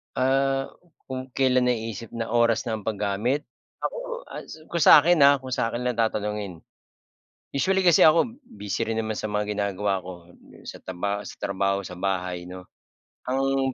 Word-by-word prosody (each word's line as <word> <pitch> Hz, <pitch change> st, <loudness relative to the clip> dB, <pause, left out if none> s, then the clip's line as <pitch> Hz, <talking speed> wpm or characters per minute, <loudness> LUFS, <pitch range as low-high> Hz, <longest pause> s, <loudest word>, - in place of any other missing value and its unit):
Ah, 135 Hz, +1 st, +1 dB, 0.4 s
kung 130 Hz, 0 st, -5 dB
kelan 130 Hz, -2 st, +3 dB
naiisip 115 Hz, -2 st, -3 dB
na 115 Hz, -1 st, -3 dB
oras 115 Hz, -1 st, +3 dB
na 110 Hz, -2 st, -2 dB
ang 105 Hz, -, -12 dB
pag-gamit? 110 Hz, +6 st, -1 dB, 0.4 s
Ako -, -, -2 dB, 0.3 s
ah, -, -, -7 dB, 0.3 s
kung 170 Hz, -3 st, +1 dB
sakin 165 Hz, +3 st, +7 dB
ah, 140 Hz, 0 st, +7 dB
kung 130 Hz, -1 st, -8 dB
sakin 120 Hz, 0 st, -1 dB
lang 125 Hz, -1 st, -1 dB
tatanungin. 105 Hz, -5 st, -2 dB, 0.9 s
Usually 190 Hz, +7 st, +2 dB
kasi 175 Hz, -3 st, +6 dB
ako 170 Hz, +10 st, +4 dB
busy 105 Hz, -, -4 dB
rin 115 Hz, -, -1 dB
naman 110 Hz, -1 st, -3 dB
sa -, -, -3 dB
mga 105 Hz, 0 st, -1 dB
ginagawa 100 Hz, -1 st, -1 dB
ko, 90 Hz, -1 st, -10 dB
dun -, -, -18 dB
sa -, -, -8 dB
tarabaho 100 Hz, +3 st, -3 dB
sa -, -, -9 dB
trabaho 100 Hz, 0 st, 0 dB
sa 90 Hz, -, -8 dB
bahay 90 Hz, -2 st, -2 dB
'no. 90 Hz, 0 st, -9 dB, 0.6 s
Ang 135 Hz, 0 st, +1 dB
115 Hz, 160 wpm, -25 LUFS, 100-135 Hz, 0.9 s, sakin